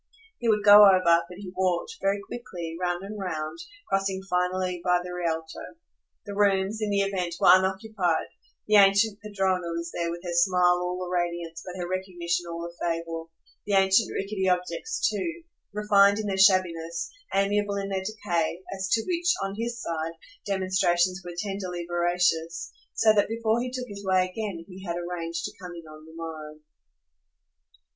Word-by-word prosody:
He 235 - 0
would 210 -2 +2
go 205 0 +10
over, 185 -1 +5 0.3
but 180 - -10
he 190 -2 -9
walked, 185 - -1
very 200 +1 +1
quickly, 175 -9 -6
round 175 0 -1
and 205 +1 -7
round, 160 - -4 0.3
crossing 195 -1 -1
finally 180 0 -1
by 180 -1 +3
the 180 0 -7
Rialto. 165 - -4 0.5
The 205 - -6
rooms, 200 +1 +2
in 215 - 0
the 200 -1 +2
event, 185 -3 -2
were - - +7
unoccupied; 190 -1 +2 0.4
the 210 0 +5
ancient 200 +1 +5
padrona 190 -4 -1
was 170 0 -4
there 170 0 -2
with 170 +1 -6
her 175 -1 -4
smile 180 0 +4
all 180 +1 -3
a - - -7
radiance 170 -2 -3
but 185 0 -8
her 175 - -3
recognition 175 -2 -2
all 170 0 -5
a 170 - -8
fable; 165 -1 -3 0.4
the 205 - -1
ancient 190 +1 +4
rickety 195 -1 -1
objects 180 - -1
too, 340 -1 -3 0.3
refined 205 -1 +4
in 215 - -3
their 200 -2 -1
shabbiness, 170 -3 +2 0.2
amiable 200 +1 +1
in 200 0 -3
their 190 -1 -1
decay, 185 -4 -2
as 190 0 -3
to 225 - +2
which, 350 -1 0
on 195 0 -3
his 235 +2 -3
side, 165 -4 -3 0.3
demonstrations 185 -2 +1
were 175 -1 -8
tenderly 185 -3 -4
veracious; 175 -1 0 0.2
so 220 -1 +5
that 205 -1 +2
before 225 0 0
he 250 - -3
took 250 0 -4
his 200 -2 -9
way 185 -1 +2
again 185 -3 -5
he 190 0 -11
had 170 -3 -3
arranged 170 -1 -4
to - - -6
come 180 -1 -8
in 170 -1 -10
on 155 0 -13
the 160 - -14
morrow. 155 -2 -7
185 Hz, 175 wpm, -26 LUFS, 175-200 Hz, 0.5 s, go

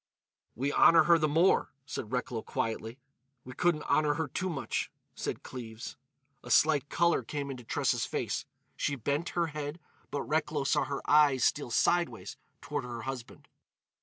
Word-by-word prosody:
"We 135 +5 -1
honour 165 -1 +7
her 170 +1 +5
the 155 - +2
more," 165 +6 +3 0.2
said 110 -4 -5
Recklow 125 -2 -2
quietly. 115 +2 -3 0.5
"We 125 - -9
couldn't 170 +1 +1
honour 150 -1 +2
her 160 -1 -1
too 185 +7 -2
much," 145 -6 -2 0.2
said - - -4
Cleves. 115 -3 -7 0.5
A - - -10
slight 150 -2 +4
colour 170 -3 +2
came 140 +3 -4
into 125 -2 -8
Tressa's - - 0
face; - - -2 0.3
she 140 - -1
bent 140 +6 -1
her 170 - +3
head, 150 +2 -4 0.3
but 145 - -2
Recklow 150 -1 0
saw 135 - +2
her 140 -1 -5
eyes 145 -4 +5
steal 145 -3 +1
sideways 175 +8 +1 0.3
toward 145 -2 -3
her 120 -2 -6
husband. 130 -3 -7
145 Hz, 160 wpm, -30 LUFS, 125-155 Hz, 0.5 s, honour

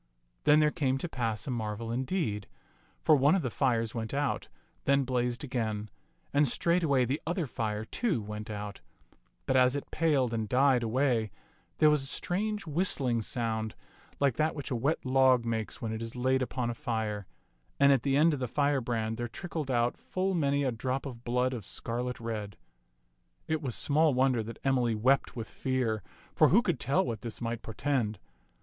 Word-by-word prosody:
Then 150 +1 +6
there 150 0 +3
came 135 -6 0
to 155 - -3
pass 115 -7 -2
a 135 - -3
marvel 115 -1 -3
indeed, 120 - -2 0.6
for 155 - +6
one 145 +5 +4
of 185 - 0
the 125 - -2
fires 115 -4 +1
went 115 +2 -4
out, 145 -1 -1 0.4
then 140 0 +4
blazed 125 -1 -1
again; 110 -6 -3 0.4
and 145 0 +4
straightway 150 -2 +2
the 135 +5 -2
other 170 0 0
fire, 110 -4 -3
too, 210 - -1
went 105 0 -6
out; 105 -1 -6 0.6
but 130 - +1
as 130 +1 +5
it 145 - -5
paled 140 -7 +2
and 110 -2 -2
died 130 -1 +4
away, 120 -1 +1 0.5
there 155 -1 +6
was 150 -2 +2
a 135 - -3
strange 210 +7 -2
whistling 145 -7 +1
sound 110 -1 -2 0.4
like 140 -4 +2
that 155 +1 +1
which 145 -3 -6
a - - +1
wet 140 +7 0
log 130 -2 +4
makes 115 -1 -3
when 110 -1 -2
it 110 - -4
is 115 +1 -5
laid 130 +1 +1
upon 125 -1 -1
a - - -3
fire, 110 -4 -3 0.5
and 140 0 +6
at 135 -3 +4
the 135 +1 +1
end 160 +2 +5
of 145 - -2
the 125 - -2
firebrand 120 -5 0
there 120 - -2
trickled 155 +2 -5
out 120 -1 +1
full 190 +1 -2
many 140 -4 +1
a 130 - +1
drop 130 +4 -2
of 120 -4 -7
blood 125 +2 +1
of 115 -4 -5
scarlet 120 +5 -3
red. 110 -4 -5 0.9
It 160 -1 0
was 130 -6 -2
small 150 -1 +3
wonder 130 -2 +3
that 115 +2 -7
Emily 125 -4 +2
wept 130 +6 +2
with 115 -2 -5
fear, 125 -5 -1 0.3
for - - +5
who 225 +7 +5
could 175 - 0
tell 135 +3 +1
what 115 -4 -4
this 115 -2 -6
might 115 -1 -3
portend 115 -2 -1
125 Hz, 185 wpm, -30 LUFS, 115-140 Hz, 0.9 s, Then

